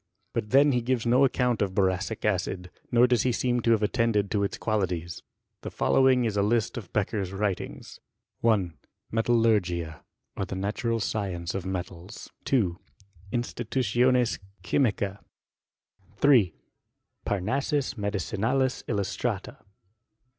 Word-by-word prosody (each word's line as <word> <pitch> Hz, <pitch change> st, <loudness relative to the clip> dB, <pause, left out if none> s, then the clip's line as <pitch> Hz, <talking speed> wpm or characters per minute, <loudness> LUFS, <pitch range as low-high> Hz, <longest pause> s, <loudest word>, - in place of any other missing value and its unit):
* -, -, -47 dB
But 105 Hz, -, -2 dB
then 140 Hz, +4 st, +5 dB
he 125 Hz, -2 st, +1 dB
givea 120 Hz, 0 st, -1 dB
no 125 Hz, +3 st, +5 dB
account 125 Hz, -3 st, +1 dB
of 95 Hz, -2 st, -1 dB
boracic 95 Hz, +2 st, 0 dB
acid, 90 Hz, -2 st, -1 dB, 0.2 s
nor 120 Hz, 0 st, +6 dB
does 125 Hz, -3 st, +3 dB
he 130 Hz, -, +2 dB
seem 120 Hz, +1 st, 0 dB
to 115 Hz, 0 st, +2 dB
have 110 Hz, -1 st, +1 dB
attended 105 Hz, -3 st, +1 dB
to 105 Hz, -, +1 dB
its 100 Hz, -, -2 dB
qualities. 90 Hz, -6 st, -2 dB, 0.4 s
The -, -, -5 dB
following* 130 Hz, -2 st, +3 dB
is 110 Hz, -2 st, -1 dB
a 100 Hz, -, +2 dB
list 110 Hz, +2 st, +1 dB
of 105 Hz, -8 st, -7 dB
Beccher's 100 Hz, -2 st, -1 dB
writings: 100 Hz, -1 st, -4 dB, 0.4 s
1, 100 Hz, -7 st, +2 dB, 0.4 s
Metallurgia, 105 Hz, -9 st, +1 dB, 0.3 s
or 100 Hz, -, -2 dB
the 95 Hz, -, -6 dB
Natural 115 Hz, +4 st, -1 dB
Science 95 Hz, -5 st, -2 dB
of 95 Hz, -1 st, -4 dB
Metals. 95 Hz, +1 st, -6 dB, 0.2 s
3. 110 Hz, -11 st, +2 dB, 0.6 s
Institutiones 120 Hz, +1 st, +1 dB, 0.2 s
Chymicec. 100 Hz, -1 st, 0 dB, 1.0 s
3. 115 Hz, -, +5 dB, 0.7 s
Parnassus 135 Hz, +9 st, -1 dB
Medicinalis 110 Hz, +5 st, -1 dB
illustrata. 100 Hz, -4 st, -2 dB
110 Hz, 125 wpm, -27 LUFS, 95-120 Hz, 1.0 s, nor